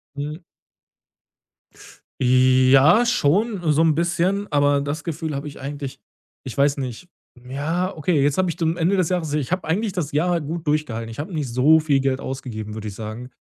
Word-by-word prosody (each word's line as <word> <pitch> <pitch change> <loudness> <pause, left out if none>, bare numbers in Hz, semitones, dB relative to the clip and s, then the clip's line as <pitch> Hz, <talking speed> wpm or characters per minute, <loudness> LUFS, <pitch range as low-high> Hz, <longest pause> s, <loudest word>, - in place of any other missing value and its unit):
Mhm. 150 +4 -5 1.8
Ja, 130 - +5
schon 210 -1 +1
so 150 +2 +3
'n 160 -2 +3
bisschen, 175 +4 0
aber 145 -1 +3
das 145 +3 -4
Gefühl 160 -1 -4
habe 140 +2 -4
ich 145 - -10
eigentlich 140 -1 -6 0.4
ich 130 -5 -8
weiß 140 +1 +3
nicht. 135 +5 -6 0.4
Ja, 160 +8 -2
okay, 155 -1 +1
jetzt 140 0 +1
habe 185 -1 +2
ich 165 - -4
dann 160 -1 +1
am 170 - -5
Ende 180 +4 +1
des 185 -3 +2
Jahres 175 -4 -1
ich 150 +1 -1
habe 180 - -2
eigentlich 195 +6 -1
das 160 -5 -3
Jahr 170 +3 +1
gut 160 +2 -5
durchgehalten. 125 -7 -1
Ich 115 - -9
habe 160 +6 -5
nicht 150 -4 -2
so 145 +6 +5
viel 145 -3 +1
Geld 135 -1 0
ausgegeben, 115 -6 -6
würde 110 -1 -5
ich 100 - -9
sagen. 110 +4 -7
150 Hz, 190 wpm, -22 LUFS, 135-170 Hz, 1.8 s, Ja